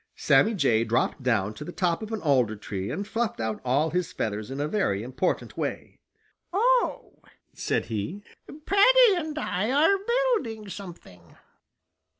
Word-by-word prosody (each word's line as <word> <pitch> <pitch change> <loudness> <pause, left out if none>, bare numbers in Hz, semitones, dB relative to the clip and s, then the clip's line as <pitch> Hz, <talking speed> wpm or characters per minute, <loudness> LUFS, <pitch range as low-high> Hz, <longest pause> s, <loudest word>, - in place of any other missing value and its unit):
Sammy 220 +1 +3
Jay 115 - +2
dropped 115 +4 0
down 110 -5 0
to 110 - -8
the 175 - -7
top 175 0 0
of 220 0 -7
an 220 - -4
alder 125 -8 +2
tree 100 -2 -5
and 200 +6 -4
fluffed 225 - -2
out 110 -1 -3
all 140 +5 +1
his 180 +1 -1
feathers 105 - -3
in 135 +1 -5
a 145 - 0
very 150 - 0
important 130 +8 -2
way. - - -5 0.5
"Oh," 485 +6 +1 0.3
said - - -1
he, 115 - -4 0.4
"Paddy 470 +2 +6
and 310 -3 -4
I 210 -7 -1
are 320 +9 +3
building 455 - 0
something!" 170 - -11
180 Hz, 155 wpm, -26 LUFS, -, 0.5 s, Paddy